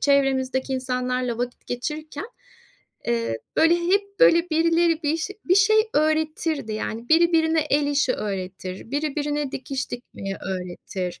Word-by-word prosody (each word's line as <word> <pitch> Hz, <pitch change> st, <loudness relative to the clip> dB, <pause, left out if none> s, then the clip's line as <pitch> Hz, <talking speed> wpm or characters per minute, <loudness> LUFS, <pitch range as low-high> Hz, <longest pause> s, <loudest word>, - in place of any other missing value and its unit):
çevremizdeki 265 Hz, -2 st, +2 dB
insanlarla 250 Hz, -2 st, -1 dB
vakit 245 Hz, 0 st, -4 dB
geçirirken, 300 Hz, -, -4 dB, 0.8 s
eee, 230 Hz, -, 0 dB, 0.2 s
böyle 325 Hz, +1 st, +5 dB
hep, 400 Hz, +5 st, 0 dB
böyle, 340 Hz, -7 st, +5 dB
birileri 330 Hz, 0 st, +2 dB
bir 305 Hz, +3 st, +2 dB
şe 395 Hz, +5 st, -4 dB
bir 365 Hz, -, +4 dB
şey 430 Hz, +2 st, +5 dB, 0.2 s
öğretirdi. 310 Hz, -4 st, 0 dB
Yani, 225 Hz, +2 st, -4 dB
biri 335 Hz, +2 st, +5 dB
birine 320 Hz, 0 st, +3 dB
el 295 Hz, -1 st, +1 dB
işi 285 Hz, -2 st, +2 dB
öğretir, 190 Hz, 0 st, -5 dB
biri 290 Hz, +1 st, -2 dB
birine 295 Hz, -1 st, -1 dB
dikiş 270 Hz, 0 st, -4 dB
dikmeyi 195 Hz, -5 st, -6 dB
öğretir. 180 Hz, 0 st, -5 dB
285 Hz, 135 wpm, -24 LUFS, 245-320 Hz, 0.8 s, böyle